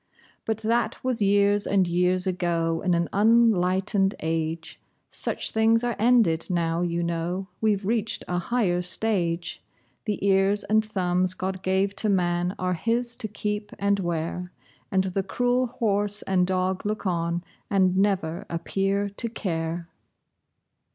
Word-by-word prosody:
But 220 Hz, -1 st, -1 dB
that 235 Hz, +2 st, 0 dB
was 255 Hz, -3 st, 0 dB
years 200 Hz, 0 st, +3 dB
and 190 Hz, -2 st, +2 dB
years 180 Hz, +2 st, +1 dB
ago, 170 Hz, -3 st, 0 dB
in 180 Hz, -2 st, +2 dB
an 170 Hz, 0 st, 0 dB
unenlightened 200 Hz, -2 st, +3 dB
age! 160 Hz, 0 st, -3 dB, 0.3 s
Such -, -, -2 dB
things 225 Hz, +1 st, +3 dB
are 240 Hz, -2 st, -1 dB
ended, 220 Hz, -8 st, +4 dB
now, 170 Hz, -1 st, 0 dB
you 170 Hz, -1 st, -1 dB
know; 170 Hz, +3 st, -3 dB
we've 210 Hz, -3 st, +1 dB
reached 220 Hz, 0 st, -1 dB
a 180 Hz, 0 st, -1 dB
higher 180 Hz, -3 st, 0 dB
stage. 175 Hz, -3 st, -1 dB, 0.4 s
The 210 Hz, -3 st, -1 dB
ears 195 Hz, +1 st, +3 dB
and 215 Hz, +1 st, +2 dB
thumbs 185 Hz, -3 st, 0 dB
God 190 Hz, 0 st, -4 dB
gave 190 Hz, +1 st, 0 dB
to 215 Hz, +1 st, +2 dB
man 175 Hz, -1 st, +1 dB
are 180 Hz, 0 st, -1 dB
his 235 Hz, +6 st, -1 dB
to 220 Hz, -, -3 dB
keep 210 Hz, 0 st, -4 dB
and 200 Hz, 0 st, +1 dB
wear, 175 Hz, 0 st, -3 dB, 0.4 s
And 190 Hz, -1 st, +2 dB
the 190 Hz, +1 st, -1 dB
cruel 245 Hz, +6 st, 0 dB
horse 205 Hz, -3 st, +1 dB
and 180 Hz, -2 st, +1 dB
dog 185 Hz, 0 st, -1 dB
look 210 Hz, 0 st, -3 dB
on, 170 Hz, -1 st, -1 dB, 0.3 s
and 190 Hz, -2 st, +3 dB
never 190 Hz, -4 st, 0 dB
appear 195 Hz, +4 st, -1 dB
to 200 Hz, +4 st, -4 dB
care. 165 Hz, -5 st, -3 dB
190 Hz, 145 wpm, -25 LUFS, 175-210 Hz, 0.4 s, ended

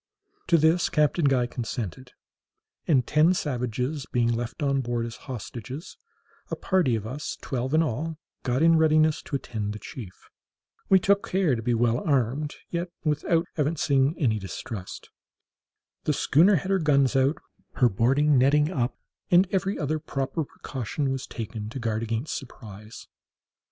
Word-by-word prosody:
To 170 Hz, -, +5 dB
this 160 Hz, +3 st, +3 dB
Captain 150 Hz, +1 st, +2 dB
Guy 130 Hz, -3 st, +3 dB
consented; 120 Hz, 0 st, -5 dB, 0.7 s
and 135 Hz, -7 st, +3 dB
ten 155 Hz, +4 st, +4 dB
savages 125 Hz, 0 st, -2 dB
being 120 Hz, -1 st, +2 dB
left 120 Hz, +4 st, -4 dB
on 140 Hz, -1 st, +2 dB
board 120 Hz, -1 st, -2 dB
as 115 Hz, 0 st, -6 dB
hostages, 125 Hz, -, -7 dB, 0.5 s
a -, -, -2 dB
party 180 Hz, -11 st, +1 dB
of 110 Hz, -2 st, -4 dB
us, 135 Hz, +6 st, -5 dB
twelve 130 Hz, +2 st, -2 dB
in 160 Hz, -, +5 dB
all, 155 Hz, +4 st, -3 dB, 0.2 s
got 130 Hz, +3 st, 0 dB
in 165 Hz, -1 st, +6 dB
readiness 155 Hz, -1 st, +3 dB
to -, -, -5 dB
attend 105 Hz, -6 st, -3 dB
the -, -, -6 dB
chief. 100 Hz, -8 st, -10 dB, 0.6 s
We 190 Hz, -, +7 dB
took 200 Hz, +4 st, +2 dB
care 180 Hz, -8 st, +2 dB
to 115 Hz, -, -4 dB
be 120 Hz, +1 st, +1 dB
well 120 Hz, +1 st, +2 dB
armed, 140 Hz, +1 st, 0 dB, 0.2 s
yet 175 Hz, +1 st, -2 dB
without 165 Hz, +2 st, +1 dB
evincing 145 Hz, -1 st, +2 dB
any 115 Hz, -8 st, +1 dB
distrust. 95 Hz, 0 st, -7 dB, 0.9 s
The 150 Hz, -, +2 dB
schooner 170 Hz, +8 st, +4 dB
had 185 Hz, +4 st, -1 dB
her 195 Hz, -, +3 dB
guns 140 Hz, -4 st, +3 dB
run 135 Hz, 0 st, +4 dB
out, 155 Hz, -, -5 dB, 0.4 s
her 125 Hz, -, +4 dB
boarding 135 Hz, +7 st, +3 dB
nettings 150 Hz, +4 st, +3 dB
up, 125 Hz, -7 st, -1 dB, 0.3 s
and 180 Hz, +2 st, +5 dB
every 195 Hz, +1 st, 0 dB
other 155 Hz, 0 st, -1 dB
proper 140 Hz, +1 st, -2 dB
precaution 135 Hz, 0 st, -4 dB
was 135 Hz, -1 st, -4 dB
taken 110 Hz, -2 st, -6 dB
to 120 Hz, -, -7 dB
guard 115 Hz, -2 st, -1 dB
against 115 Hz, +5 st, -2 dB
surprise. 110 Hz, -4 st, -10 dB
135 Hz, 155 wpm, -26 LUFS, 120-155 Hz, 0.9 s, We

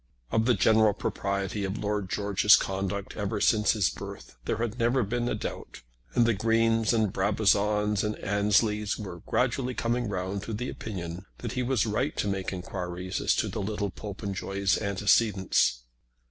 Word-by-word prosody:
Of 110 Hz, 0 st, +2 dB
the 125 Hz, -1 st, +4 dB
general 110 Hz, +2 st, +4 dB
propriety 100 Hz, 0 st, -2 dB
of 95 Hz, +2 st, -2 dB
Lord 105 Hz, -3 st, -2 dB
George's 105 Hz, +1 st, +4 dB
conduct 95 Hz, +1 st, -2 dB
ever 100 Hz, -1 st, -2 dB
since 105 Hz, 0 st, +3 dB
his 105 Hz, -4 st, +2 dB
birth -, -, -9 dB
there -, -, -1 dB
had 115 Hz, +1 st, -3 dB
never 120 Hz, +2 st, +2 dB
been 120 Hz, +3 st, -1 dB
a -, -, 0 dB
doubt, -, -, -7 dB, 0.3 s
and 120 Hz, -, +5 dB
the 115 Hz, -, +3 dB
Greens 115 Hz, +1 st, +2 dB
and 110 Hz, -4 st, +1 dB
Brabazons 105 Hz, +1 st, +2 dB
and 105 Hz, 0 st, -1 dB
Ansleys 105 Hz, +1 st, +1 dB
were 95 Hz, -5 st, -7 dB
gradually 125 Hz, 0 st, 0 dB
coming 120 Hz, -1 st, -1 dB
round 95 Hz, 0 st, -3 dB
to 110 Hz, -, -6 dB
the 125 Hz, +4 st, -3 dB
opinion 90 Hz, -3 st, -6 dB
that 120 Hz, -, -5 dB
he 125 Hz, -, -2 dB
was 125 Hz, -2 st, +1 dB
right 105 Hz, -1 st, -1 dB
to -, -, 0 dB
make 95 Hz, -1 st, -2 dB
enquiries 90 Hz, 0 st, -4 dB
as -, -, +2 dB
to -, -, 0 dB
the 110 Hz, -, -4 dB
little 105 Hz, 0 st, -2 dB
Popenjoy's 100 Hz, -1 st, -2 dB
antecedents. 100 Hz, -, +2 dB
105 Hz, 165 wpm, -28 LUFS, 95-115 Hz, 0.3 s, and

